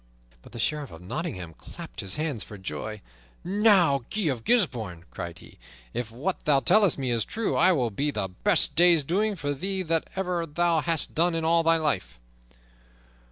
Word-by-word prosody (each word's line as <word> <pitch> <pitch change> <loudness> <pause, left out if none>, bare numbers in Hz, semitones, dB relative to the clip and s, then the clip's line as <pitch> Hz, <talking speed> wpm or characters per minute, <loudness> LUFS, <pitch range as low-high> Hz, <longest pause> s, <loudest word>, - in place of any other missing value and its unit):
But - - -16
the 120 - -9
Sheriff 145 +3 -1
of 80 +1 -12
Nottingham 95 - -5
clapped - - -10
his 95 - -3
hands 150 -7 -2
for 105 - -10
joy. 105 +2 -6 0.4
"Now, 190 -7 +4
Guy 215 - -2
of 120 -4 -5
Gisbourne," 115 - 0
cried 85 -1 -6
he, - - -16 0.3
"if 120 -2 -3
what 140 +12 -3
thou 145 -2 +4
tellest 200 +4 +4
me 130 -3 -2
is 115 -2 +1
true, 225 -1 -2
it 185 +2 +6
will 125 -8 0
be 140 +9 -1
the 105 -8 -2
best 160 - +2
day's 170 -1 +5
doings 200 +6 0
for 145 -2 -1
thee 190 +6 -2
that 165 -1 0
ever 180 -3 -1
thou 170 +2 +1
hast 165 0 0
done 170 +1 +2
in 165 -1 -1
all 165 +1 +4
thy 165 0 +3
life." 95 - -2
155 Hz, 185 wpm, -26 LUFS, 115-175 Hz, 0.4 s, it